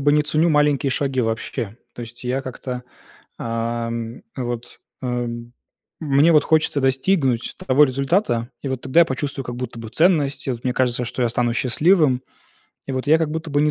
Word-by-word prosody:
бы 145 +1 +3
не 150 0 +4
ценю 155 +3 +2
маленькие 145 -3 +2
шаги 135 -1 0
вообще. 115 -1 -3 0.2
То 120 - -7
есть 120 +2 -11
я 130 +2 0
как-то, 125 -1 -6 0.6
ам, 115 0 -3
вот, 120 -2 -5 0.2
эм, 120 -1 -3 0.5
мне 150 +1 +4
вот 150 -2 +5
хочется 155 -2 +2
достигнуть 135 -1 +1
того 140 +3 +6
результата, 135 - 0
и 140 - -3
вот 130 -1 -3
тогда 130 +6 +3
я 170 - +8
почувствую 135 +1 -3
как 120 0 -6
будто 125 -2 -5
бы 115 - -7
ценность, 155 -6 +2
и - - 0
вот 120 -2 -5
мне 125 - +1
кажется, 125 -1 0
что 125 +2 -3
я 120 - +3
стану 120 0 0
счастливым, 135 +1 +3 0.6
и 135 - -4
вот 130 +1 -3
я 160 +2 +5
как 160 -2 -1
будто 160 0 -4
бы 145 +1 +2
не 150 - +3
130 Hz, 190 wpm, -21 LUFS, 120-150 Hz, 0.6 s, я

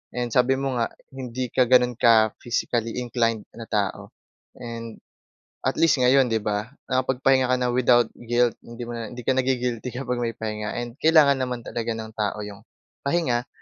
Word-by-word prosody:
and 120 -1 -2
sabi 125 +1 +3
mo 135 -2 -2
nga, 115 - +1 0.2
hindi 130 -2 -5
ka 125 -2 +3
gano'n 125 -1 +4
ka 110 -2 +5
physically 120 -1 -2
inclined 115 -3 0
na 115 -1 -10
tao. 100 -2 -1 0.5
And, 115 -1 -7 0.7
at 130 - -1
least 165 -2 +5
ngayon 130 +1 +5
'di 110 -3 -1
ba, 105 +5 -3 0.2
nakapagpahinga 130 0 +2
ka 130 - +3
na 125 -1 0
without 120 -1 +3
guilt. 120 0 +2
Hindi 120 +1 -9
mo 120 - -6
na 110 - -5
hindi 125 +2 -9
ka 130 - +2
nagi-guilty 125 -2 -1
kapag 125 -2 -2
may 115 -1 -2
pahinga. 105 -1 -4
And, 120 +2 -5
kailangan 155 -4 +5
naman 125 -2 -3
talaga 115 0 -3
ng 110 0 -7
tao 105 -1 -2
yung 105 0 -9 0.5
pahinga 130 -6 0
120 Hz, 175 wpm, -24 LUFS, 115-130 Hz, 0.7 s, ka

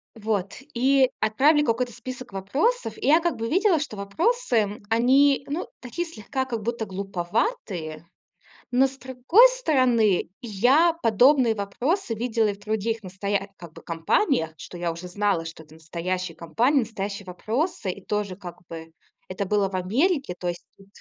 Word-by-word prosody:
вот, 210 -3 -2 0.2
и 265 +2 +4
отправили 290 +8 +3
какой-то 245 -1 0
список 255 +1 -8
вопросов, 290 - -1
и 435 - -3
я 310 +4 +6
как 345 0 -1
бы 230 0 -4
видела, 375 -1 +3
что 275 -8 -5
вопросы, 210 - 0
они, 270 +5 +4
ну, 305 +5 -3
такие 260 +8 -4
слегка, 265 -1 -4
как 230 -4 -4
будто 235 0 -2
глуповатые, 185 - -3 0.7
но, 255 +2 +4
с 265 0 -12
другой 260 - +5
стороны, 255 - +2
я 250 - +3
подобные 245 +2 +5
вопросы 235 - -2
видела 225 -1 0
и 205 - 0
в 200 - -16
других 220 +1 -2
настоя 195 +2 -3
как 170 -2 -12
бы - - -12
компаниях, 165 - 0
что 175 - -9
я 170 -1 -1
уже 170 +2 -8
знала, 190 -2 0
что 165 0 -9
это 155 0 -18
настоящая 170 +2 -4
компания, 230 - +1
настоящие 205 -3 -4
вопросы, 220 - -2
и 195 +1 -11
тоже 210 -2 -2
как 180 -2 -9
бы 165 -1 -8 0.4
это 200 +2 -3
было 200 0 +1
в 190 - -6
Америке, 260 - 0
то 180 - -4
есть. 175 0 -4
Тут. 195 - -18
220 Hz, 160 wpm, -25 LUFS, 190-270 Hz, 0.7 s, я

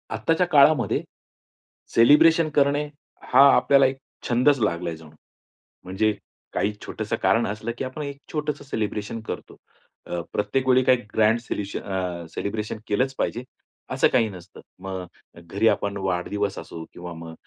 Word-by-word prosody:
आत्ताच्या 165 +2 +1
काळामध्ये, 145 -4 +4 0.9
सेलिब्रेशन 155 +7 +6
करणे 145 +1 +3 0.5
हा 130 - +8
आपल्याला 140 -1 +5
एक 130 0 0 0.3
छंदचं 125 +1 +3
लागला 85 -3 -1
जणू. 80 -1 -14 0.7
म्हणजे 95 +4 0 0.4
काही 105 - 0
छोटंसं - - -3
कारण 115 +1 +3
असलं, 110 +2 -4
की - - -3
आपण 130 +4 -6
एक 140 -1 -6 0.2
छोटंसं 150 -2 -3
सेलिब्रेशन 110 -3 -3
करतो. - - -7 0.5
अ, 90 - -3
प्रत्येक 115 +6 -1
वेळी 130 0 +5
काही 125 0 +4 0.2
ग्रँड 110 +1 +3
सेल्युशन 100 -4 -4
अ, 90 -3 -4
सेलिब्रेशन 105 +4 -4
केलंच 130 +6 0
पाहिजे, 120 - -2 0.5
असं - - +3
काही 115 -3 +3
नसतं. 90 -2 -12 0.2
मग 95 -1 -5 0.4
घरी 100 +6 0
आपण 100 -2 +1
वाढदिवस 95 +1 -2
असो 80 0 -8
किंवा 90 0 -8
मग 80 0 -9
110 Hz, 140 wpm, -24 LUFS, 95-135 Hz, 0.9 s, हा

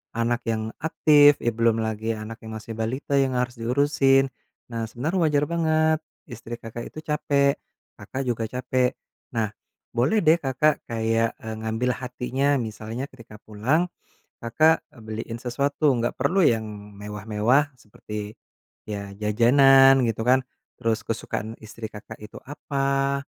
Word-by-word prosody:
anak 120 +1 -1
yang 110 0 -1
aktif, 145 -2 +5
ya 120 - +2
belum 115 0 +1
lagi 110 +1 -2
anak 110 +1 -8
yang 110 -1 -8
masih 110 +1 -8
balita 125 +5 -1
yang 130 -2 +1
harus 125 -1 -2
diurusin. 135 +2 +3 0.4
Nah, 115 -1 -3
sebenarnya 155 - -2
wajar 145 -1 +2
banget, 155 -1 +2 0.2
istri 120 -2 -8
Kakak 115 0 -8
itu 155 - -10
capek. 140 -2 +1 0.4
Kakak 135 +1 -5
juga 115 -3 -2
capek. 125 +1 0 0.4
Nah, 110 -2 0 0.4
boleh 150 - +2
deh 160 +2 +5
Kakak 140 +1 +1
kayak, 115 0 0
eee, 110 0 -7
ngambil 110 +3 -1
hatinya. 130 +2 0
Misalnya 115 +2 -4
ketika 115 -4 -14
pulang, 130 +12 0 0.5
Kakak 155 +8 +3 0.2
beliin 110 +1 -6
sesuatu, 140 +4 +1
enggak 120 0 -2
perlu 175 +9 +2
yang 115 -8 +3 0.3
mewah-mewah, 105 +7 +1
seperti 105 -1 -8 0.6
ya 100 -1 -5
jajanan, 135 +6 +6
gitu 115 -1 -1
kan. 130 +1 +4 0.4
Terus 115 -1 -1
kesukaan 110 0 -4
istri 110 +1 -7
Kakak 105 -1 -11
itu 105 0 -11
apa, 140 0 -1
120 Hz, 135 wpm, -24 LUFS, 110-140 Hz, 0.6 s, jajanan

